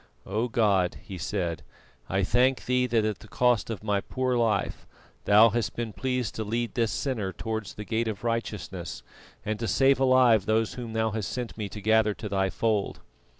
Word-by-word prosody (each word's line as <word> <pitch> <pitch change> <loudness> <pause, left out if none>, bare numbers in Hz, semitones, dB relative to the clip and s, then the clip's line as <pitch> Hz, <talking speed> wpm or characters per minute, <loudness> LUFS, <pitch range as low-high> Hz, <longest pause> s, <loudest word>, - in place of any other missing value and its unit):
"O 110 +5 -1
God," 100 -6 +2
he 95 -2 -8
said, 90 -3 -2 0.5
"I 95 +1 +1
thank 125 +6 +2
Thee 125 0 +2
that 115 -3 +2
at 110 -2 -2
the - - -14
cost 125 0 +2
of 110 -3 -5
my 100 -2 +1
poor 130 +2 -1
life 115 -4 0 0.4
Thou 105 +3 +7
hast 115 +1 -2
been 115 -2 -4
pleased 125 -1 -2
to 110 - -3
lead 115 +2 -2
this 115 -2 +1
sinner 115 -9 -2
towards 110 0 -5
the 105 - -7
Gate 115 +3 -1
of 110 -1 -4
Righteousness, 105 -7 -4 0.4
and 110 0 -2
to 115 - -2
save 135 +2 +3
alive 130 -6 +4
those 110 0 +1
whom 120 -3 -6
Thou 110 0 +1
hast 105 -2 -3
sent 125 -2 -4
me 105 -2 -4
to 105 - -8
gather 110 0 +3
to 110 - -6
Thy 95 -1 0
Fold." 105 -1 -1
110 Hz, 195 wpm, -27 LUFS, 105-120 Hz, 0.5 s, Thou